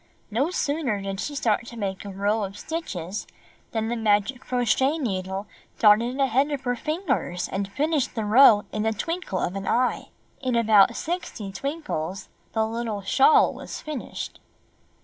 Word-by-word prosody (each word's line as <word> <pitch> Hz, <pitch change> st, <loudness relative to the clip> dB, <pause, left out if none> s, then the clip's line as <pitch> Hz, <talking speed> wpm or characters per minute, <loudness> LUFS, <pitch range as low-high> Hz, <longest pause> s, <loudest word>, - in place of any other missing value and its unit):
No 260 Hz, +9 st, +1 dB
sooner 285 Hz, -, -1 dB
did 195 Hz, 0 st, -4 dB
she 290 Hz, -, -3 dB
start 235 Hz, -3 st, +1 dB
to 235 Hz, -, -9 dB
make 195 Hz, -3 st, -3 dB
a -, -, -5 dB
row 205 Hz, +3 st, 0 dB
of 195 Hz, +1 st, -5 dB
stitches 205 Hz, -, -5 dB, 0.4 s
than 220 Hz, -1 st, -2 dB
the 235 Hz, -, -1 dB
magic 220 Hz, +3 st, +1 dB
crochet 255 Hz, +4 st, +1 dB
needle 190 Hz, -, -3 dB, 0.3 s
darted 230 Hz, +5 st, +4 dB
ahead 270 Hz, +1 st, +3 dB
of 285 Hz, -3 st, -3 dB
her 245 Hz, -2 st, -1 dB
fingers 245 Hz, -, -2 dB
and 195 Hz, 0 st, -3 dB
finished 295 Hz, +3 st, 0 dB
the 220 Hz, -2 st, -1 dB
row 215 Hz, -1 st, +7 dB
in 215 Hz, +1 st, -1 dB
a 220 Hz, -, +2 dB
twinkle 330 Hz, -, -3 dB
of 180 Hz, +1 st, -1 dB
an 195 Hz, 0 st, -4 dB
eye. 250 Hz, +1 st, +1 dB, 0.3 s
In 255 Hz, -3 st, 0 dB
about 215 Hz, -4 st, +5 dB
sixty 315 Hz, -, -4 dB
twinkles 195 Hz, -, -4 dB, 0.2 s
the 220 Hz, -1 st, +2 dB
little 225 Hz, -2 st, -3 dB
shawl 270 Hz, +9 st, +5 dB
was -, -, -7 dB
finished. 305 Hz, -4 st, -6 dB
225 Hz, 160 wpm, -25 LUFS, 200-275 Hz, 0.4 s, row